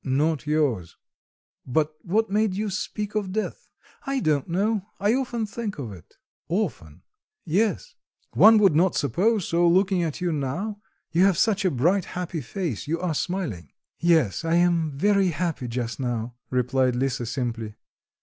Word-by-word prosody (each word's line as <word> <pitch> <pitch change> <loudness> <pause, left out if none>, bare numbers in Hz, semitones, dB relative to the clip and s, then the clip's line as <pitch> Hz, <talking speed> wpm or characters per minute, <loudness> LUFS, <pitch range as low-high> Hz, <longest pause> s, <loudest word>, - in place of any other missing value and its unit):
"Not 150 +3 0
yours.... 140 - 0 0.7
But 150 +4 0
what 215 +7 +1
made 210 -2 +1
you 210 +1 -2
speak 210 +1 -4
of 205 -3 -2
death?" 215 +2 -3 0.4
"I 275 0 0
don't 150 - +1
know. 200 +3 0
I 205 +3 +2
often 240 -3 -1
think 210 0 -5
of 125 -7 -5
it." 90 -5 -14 0.3
"Often?" 160 - -3 0.4
"Yes." 215 - 0 0.4
"One 220 0 +7
would 195 -7 +4
not 180 +3 +3
suppose 185 - +1
so, 170 +1 +3
looking 185 +1 +3
at 160 -4 -2
you 175 -1 0
now; 175 +9 -3 0.3
you 170 +3 +3
have 195 -4 +3
such 210 0 +2
a - - +5
bright, 175 +8 +1
happy 175 -3 -3
face, 150 - -4
you 165 +2 -1
are 180 -3 -1
smiling." 150 - -3 0.3
"Yes, 165 - +2
I 165 +1 +1
am 170 -4 +2
very 200 +3 +3
happy 165 -5 -2
just 120 0 -3
now," 120 -2 -2 0.2
replied 125 0 +1
Lisa 125 -2 -1
simply. 115 -3 -3
170 Hz, 160 wpm, -25 LUFS, 135-200 Hz, 0.7 s, One